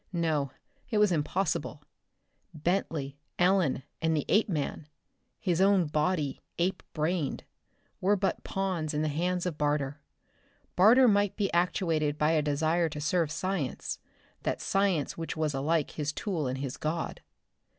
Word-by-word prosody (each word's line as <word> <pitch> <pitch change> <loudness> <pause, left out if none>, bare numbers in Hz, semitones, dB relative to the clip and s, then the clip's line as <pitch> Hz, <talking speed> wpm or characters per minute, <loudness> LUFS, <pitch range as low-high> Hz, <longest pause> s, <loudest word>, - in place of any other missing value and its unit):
No, 160 -5 0 0.4
it 220 - 0
was 210 -2 +4
impossible. 175 +4 -1 0.7
Bentley, 155 -4 -1 0.2
Ellen, 175 -8 +3 0.2
and 160 -1 +2
the 145 - -1
Apeman 165 -7 +1 0.5
his 180 -2 +1
own 195 -2 +5
body, 150 -1 0 0.2
ape 180 +3 0
brained 155 -1 -1 0.6
were 200 +3 +3
but 195 -1 -1
pawns 180 -6 -2
in 150 - +1
the 155 - +1
hands 175 +4 -1
of 170 -4 -3
Barter. 145 -1 0 0.7
Barter 235 +8 +7
might 205 -2 +3
be 200 -2 -1
actuated 165 -4 +1
by 150 +1 +3
a 160 -2 +3
desire 160 +3 +1
to 150 -1 -6
serve 155 +1 +1
science, 165 -4 -2 0.4
that - - -1
science 195 -6 0
which 165 -1 -4
was 155 -2 0
alike 150 +3 0
his 150 -1 -2
tool 165 -4 -2
and 130 +1 -2
his 135 -2 -4
god. 160 +2 -3
165 Hz, 140 wpm, -29 LUFS, 150-185 Hz, 0.7 s, Barter